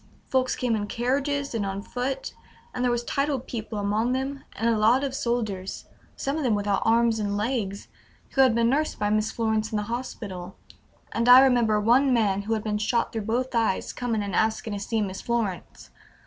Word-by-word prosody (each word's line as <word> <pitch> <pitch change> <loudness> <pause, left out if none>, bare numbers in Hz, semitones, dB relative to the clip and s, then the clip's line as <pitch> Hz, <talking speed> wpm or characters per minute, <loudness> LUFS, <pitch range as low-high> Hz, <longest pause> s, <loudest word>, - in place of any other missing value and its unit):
Folks 255 -1 +1
came 245 -3 0
in 205 -1 -2
carriages 275 +5 -1
and 225 -3 -1
on 195 0 -3
foot, 255 +3 -4 0.4
and 250 - -2
there 250 - +3
was 240 0 -1
titled 275 0 -1
people 220 -2 -5
among 210 +4 0
them, 270 +2 -3
and 225 - -1
a 230 - +3
lot 225 +5 +4
of 275 -2 -2
soldiers, 220 -7 -2 0.3
some 275 +3 -2
of 315 - -2
them 235 -5 +2
without 205 -1 0
arms 230 0 +3
and 205 -1 -1
legs, 210 -3 -2 0.4
who 270 - +3
had 255 -4 +5
been 235 0 +3
nursed 295 +5 0
by 205 0 0
Miss 215 0 +1
Florence 220 -1 -1
in - - -2
the 210 - -1
hospital, 205 -5 -6 0.6
and 230 +2 +1
I 250 +1 +10
remember 240 -5 +3
one 250 +6 +4
man 205 -5 +2
who 220 +3 -1
had 215 - -3
been 210 -1 -1
shot 230 +3 0
through 220 -3 -3
both 250 +4 -1
eyes 225 -5 0
coming 230 -4 -2
and 200 - -5
asking 220 0 0
to 200 - -3
see 215 +2 -1
Miss 190 -1 -5
Florence. 225 -7 -3
230 Hz, 205 wpm, -26 LUFS, 210-250 Hz, 0.6 s, I